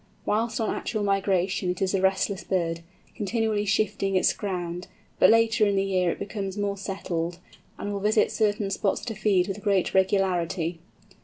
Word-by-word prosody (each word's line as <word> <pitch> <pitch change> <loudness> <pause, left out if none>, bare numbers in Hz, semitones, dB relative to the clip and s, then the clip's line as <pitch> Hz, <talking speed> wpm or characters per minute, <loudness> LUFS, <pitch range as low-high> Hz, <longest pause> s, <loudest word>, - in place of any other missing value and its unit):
Whilst 225 +2 0
on 220 - 0
actual 215 -3 -3
migration 195 -2 +1
it 180 - -2
is 190 0 0
a 195 - +1
restless 190 0 +1
bird, 170 -3 -1 0.3
continually 215 0 -1
shifting 200 -1 0
its 185 - +3
ground, 180 -3 -4 0.3
but - - +7
later 225 -1 +4
in 200 - +1
the 195 - +2
year 185 -2 +1
it - - -2
becomes 200 -1 -5
more 205 -1 -1
settled, 175 -4 -3 0.4
and 205 - -4
will 200 - -2
visit 210 +2 +2
certain 205 -2 0
spots 195 0 -1
to 230 - -3
feed 195 -4 +2
with 200 +1 -5
great 195 -3 +1
regularity. 185 -3 +1
195 Hz, 170 wpm, -26 LUFS, 185-210 Hz, 0.4 s, but